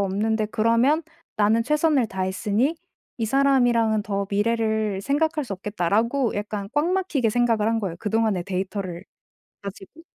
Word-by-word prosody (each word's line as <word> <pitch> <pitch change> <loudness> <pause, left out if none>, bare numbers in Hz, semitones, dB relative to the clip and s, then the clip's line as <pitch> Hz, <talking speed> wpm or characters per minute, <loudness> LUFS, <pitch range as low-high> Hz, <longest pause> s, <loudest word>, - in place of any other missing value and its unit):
없는데 215 +3 0
그러면 230 +9 +2 0.3
나는 215 +2 +3
최선을 300 -2 +2
다했으니 200 - -1 0.4
이 230 - -2
사람이랑은 240 -4 +3
더 200 -1 -2
미래를 220 -1 0
생각할 300 +5 0
수 220 - -6
없겠다.'라고 210 +6 0
약간 205 -1 -4
꽉 295 +3 +2
막히게 305 - 0
생각을 230 -2 +1
한 225 0 0
거예요 180 -4 -4
그동안의 215 -3 0
데이터를 185 -1 -4 0.6
가지고. 200 - -10
220 Hz, 340 characters per minute, -24 LUFS, 200-245 Hz, 0.6 s, 나는